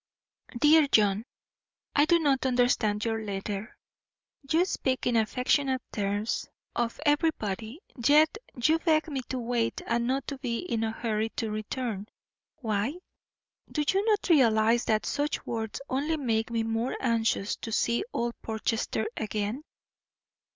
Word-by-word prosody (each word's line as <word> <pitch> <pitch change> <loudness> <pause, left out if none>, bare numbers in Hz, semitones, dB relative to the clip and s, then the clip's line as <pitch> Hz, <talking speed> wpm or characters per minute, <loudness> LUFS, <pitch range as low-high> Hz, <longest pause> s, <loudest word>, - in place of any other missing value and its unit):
DEAR 300 +3 +6
JOHN: 210 -3 +3 0.7
I 290 - +5
do 340 +2 +5
not 275 -5 +2
understand 245 -4 +2
your 225 -1 -1
letter. 200 +1 -5 0.7
You 330 +4 +4
speak 260 -8 -1
in 245 - +2
affectionate 255 +4 +1
terms 205 +1 -1 0.3
of 235 -1 -1
everybody, 285 - 0 0.3
yet 305 +4 +5 0.2
you 310 +7 +3
beg 320 -1 +2
me 275 -3 -2
to 260 - -2
wait 235 -1 -1
and 235 +1 0
not 265 +1 0 0.2
be 235 -4 -1
in 230 -9 -2
a 225 - 0
hurry 220 -1 -1
to 220 -2 -2
return. 215 -1 -3 0.5
Why? 220 +4 -1 0.8
Do 300 - 0
you 390 +1 +2
not 425 -2 +2
realise 235 - +4
that 215 -1 +1
such 295 +1 -1
words 220 -2 -3
only 295 +5 0
make 225 -5 0
me 230 -1 0
the 225 - -3
more 225 +3 -1
anxious 230 -4 +1
to 225 - -7
see 235 +2 +1
old 235 - -1
Portchester 220 +1 -1
again? 215 +4 -2
235 Hz, 140 wpm, -28 LUFS, 220-285 Hz, 0.8 s, DEAR